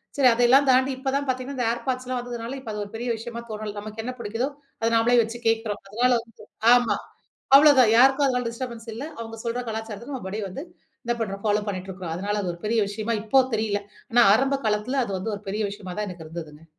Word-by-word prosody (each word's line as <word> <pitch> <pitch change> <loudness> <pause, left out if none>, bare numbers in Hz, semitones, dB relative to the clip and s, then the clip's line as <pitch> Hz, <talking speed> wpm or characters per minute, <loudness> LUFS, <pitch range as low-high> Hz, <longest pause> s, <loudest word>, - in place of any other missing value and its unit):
சரி 275 -2 +5
அதையெல்லாம் 245 +4 +5
தாண்டி 260 +1 +4
இப்பதான் 275 +1 -1
பாத்தீங்கன்னா, 260 +1 -2
இந்த 245 - 0
ஏர்பாட்ஸ்லாம் 255 +1 -2
வந்ததுனால, 245 +1 -5
இப்ப 235 -4 -7
அது 210 0 -4
ஒரு 205 - -10
பெரிய 240 +2 -3
விஷயமா 235 +1 -6
தோணல, 215 -1 -5
நமக்கு 215 +1 -6
என்ன 255 +1 -4
புடிக்குதோ 225 +4 -2 0.3
அத 230 - +2
நாமளே 240 +2 +4
வச்சு 230 +1 -4
கேக்கிறோம். 225 -2 0
அதனால 245 +4 +2
வந்து 230 -2 -17 0.3
ஆமா 245 -1 +3 0.6
அவ்ளோதான் 275 -6 +6
யாருக்கும் 270 +3 +6
அதனால 250 -2 0
டிஸ்டர்பன்ஸ் 235 -1 -7
இல்ல. 245 +6 -5
அவுங்க 225 0 -7
சொல்ற 235 +2 -1
கலாச்சாரத்துக்கும், 225 +4 -5
அப்படியே 200 +3 -4
வந்து, 275 +11 -6 0.4
என்னா 240 0 -1
பண்றோம்? 200 -2 -4
ஃபாலோ 210 0 +2
பண்ணிட்டு 185 -1 -5
இருக்கிறோம். 180 -3 -6
அதனால 205 +2 -2
அது 180 - -1
ஒரு 170 - -13
பெரிய 225 +1 +2
விஷயமா 215 +3 -2
இப்போ 265 +5 +5
தெரியல. 210 -2 -1 0.3
ஆனா 240 0 +6
ஆரம்ப 270 +2 +1
காலத்தில, 220 +6 0
அது 200 - -5
வந்து 220 +4 -3
ஒரு 200 - -11
பெரிய 210 +2 -1
விஷயமா 190 -3 -8
தான் 210 - -2
எனக்கு 170 -3 -9
இருந்ததுங்க, 160 -1 -9
230 Hz, 205 wpm, -25 LUFS, 210-255 Hz, 0.6 s, அவ்ளோதான்